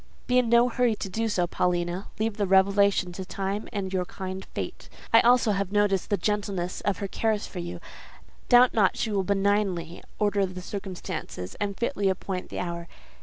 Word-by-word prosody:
"Be 250 0 +4
in 240 -2 +1
no 235 +1 +6
hurry 245 -2 +1
to 195 - -5
do 225 +4 -1
so, 180 -4 +1
Paulina. 175 +1 -1
Leave 220 -1 -1
the 205 -2 0
revelation 195 -1 +4
to 190 +2 -6
Time 195 +3 -4
and 195 -2 -3
your 185 -1 0
kind 190 +1 -6
Fate. - - -5 0.2
I 225 - +9
also 240 -2 +4
have 200 -1 -1
noticed 205 -3 +2
the 205 - +2
gentleness 200 -2 -2
of 205 -3 0
her 200 - -3
cares 215 +1 0
for 180 - -7
you: 175 0 -5 0.7
doubt 245 0 +7
not 205 -4 +3
she 220 - -1
will 200 -2 +1
benignantly 195 -4 0
order 205 -1 +2
the 185 0 -8
circumstances, 185 - -6
and 200 -1 -2
fitly 235 -5 0
appoint 190 0 -3
the - - -6
hour. 170 -1 -4
195 Hz, 185 wpm, -27 LUFS, 185-210 Hz, 0.7 s, I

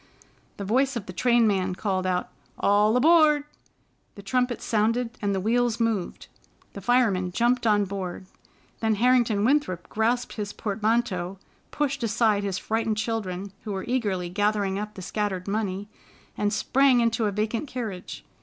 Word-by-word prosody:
The 200 - -5
voice 260 +6 +1
of 225 -4 -4
the 185 - -8
trainman 205 -4 +2
cried 185 -2 -1
out, 180 -1 -1 0.3
"All 210 +3 +3
aboard!" 305 0 +5 0.7
the 200 - -11
trumpet 250 +4 0
sounded, 230 +2 0
and 200 -2 0
the - - 0
wheels 235 +3 +1
moved. 225 -6 -1 0.5
The 200 - -8
fireman 200 -5 +2
jumped 240 +4 +1
on, 205 -1 +3
board. 190 -1 -5 0.5
Then 220 -1 +1
Harrington 235 -2 +3
Winthrop 250 - +1
grasped 235 +3 0
his 205 -1 -4
portmanteau, 210 -3 -1 0.3
pushed 280 -2 -2
aside 220 -2 +2
his 195 -2 -2
frightened 220 0 -1
children, 200 -4 -3
who 215 -2 -4
were 190 - -4
eagerly 205 -8 -1
gathering 205 0 0
up 210 0 -6
the 190 - -8
scattered 200 -2 -3
money, 200 -1 -2 0.5
and 205 0 0
sprang 260 +4 +3
into 230 -1 +1
a - - 0
vacant 215 +7 -2
carriage. 220 -8 -6
215 Hz, 150 wpm, -25 LUFS, 195-240 Hz, 0.7 s, aboard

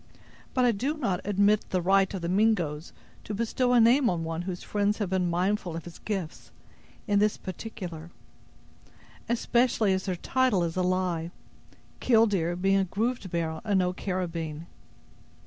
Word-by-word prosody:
But 255 -1 +3
I 245 - +5
do 265 +9 -2
not 195 -11 -1
admit 205 +1 +2
the 185 - 0
right 190 +2 +3
of 190 -3 -5
the - - -1
Mingoes 180 -6 +1 0.3
to 210 - -5
bestow 245 +3 0
a 245 - +6
name 240 +3 +5
on 170 -2 -1
one 165 +1 -3
whose 180 0 -5
friends 205 0 0
have 205 -4 -3
been 185 -2 +1
mindful 180 0 -1
of 165 - -5
his 170 -1 -11
gifts, 190 -7 -5 0.6
in 205 -2 +2
this 210 0 +2
particular; 180 -5 -7 1.2
especially 235 -3 +2
as 190 0 -2
their 185 -2 -1
title 250 -1 +1
is 165 -1 -2
a 185 - 0
lie, 180 -2 0 0.7
'killdeer' 205 -8 +3
being 195 +2 +2
a 190 - +1
grooved 220 +2 -2
barrel 160 -2 -2
and 205 -2 +1
no 180 -1 +1
carabyne. 170 -5 -4
190 Hz, 165 wpm, -27 LUFS, 175-215 Hz, 1.2 s, a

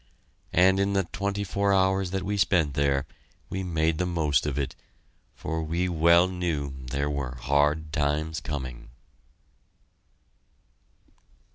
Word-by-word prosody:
And 95 +2 +5
in 100 0 +1
the 95 -1 +2
twenty 100 +3 -3
four 100 +1 0
hours 95 -1 +2
that 95 0 -2
we 105 +2 -2
spent 85 -7 +2
there 70 -1 +1 0.5
we 95 - -2
made 80 -3 0
the 90 - 0
most 75 -5 +1
of 70 -2 -2
it, 70 -3 -2 0.6
for 80 +1 -3
we 85 +3 -1
well 85 +1 +5
knew 85 -7 -2
there 70 +3 -1
were 70 -3 -3
hard 75 +4 +1
times 75 +2 0
coming! 65 -4 -6
80 Hz, 130 wpm, -27 LUFS, 70-95 Hz, 0.6 s, And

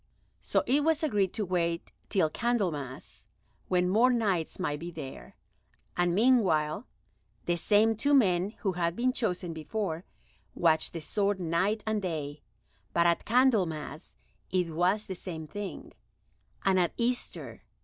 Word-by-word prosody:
So - - 0
it 285 +4 +3
was 320 +1 +2
agreed 205 - +1
to 215 -2 -1
wait 170 -2 -1 0.2
till 185 -5 +3
Candlemas, 175 - -2 0.4
when 180 0 +2
more 225 +7 +4
Knights 205 -9 0
might 150 -6 -2
be 170 +2 -6
there, 135 - -9 0.6
and 175 -1 +2
meanwhile 200 -6 +3 0.6
the 175 - +1
same 215 +5 +3
two 285 +6 +3
men 190 -7 +3
who 195 - +1
had 170 -1 -1
been 255 +3 +1
chosen 180 -8 -2
before 165 +1 -3 0.5
watched 160 -2 +2
the 165 - -5
sword 200 +4 0
night 185 +5 0
and 215 -1 0
day; 150 -5 -4 0.5
but 170 - +3
at 170 0 +2
Candlemas 185 - +1 0.3
it 180 -3 0
was 185 +6 +1
the 190 - -5
same 170 -3 -6
thing, 200 +6 -7 0.7
and 190 -1 +4
at 175 -2 +1
Easter. 245 +1 -2
185 Hz, 140 wpm, -29 LUFS, 170-220 Hz, 0.7 s, more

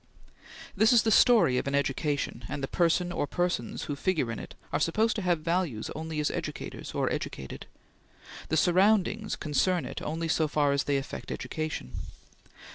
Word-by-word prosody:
This 220 +3 +5
is 235 - +6
the 220 - +2
story 215 - +5
of - - -4
an 140 - 0
education, 140 -2 -1
and 140 -1 -4
the - - 0
person 175 +2 +1
or 145 - -1
persons 175 -10 -1
who 145 - -3
figure 150 -6 0
in 115 - -5
it - - -9 0.2
are 145 - +2
supposed 220 +9 +2
to - - -1
have 175 -4 +1
values 165 -9 -1
only 160 0 -4
as 150 - +1
educators - - -5
or - - +1
educated. 65 -1 -6 0.8
The 160 - +1
surroundings 205 +5 +3
concern 170 +4 0
it - - -6
only 165 +2 -3
so 160 -1 +2
far 145 -1 +2
as 140 +1 +1
they 140 -1 +1
affect 135 - -6
education. 155 - -4
160 Hz, 175 wpm, -28 LUFS, 140-180 Hz, 0.8 s, is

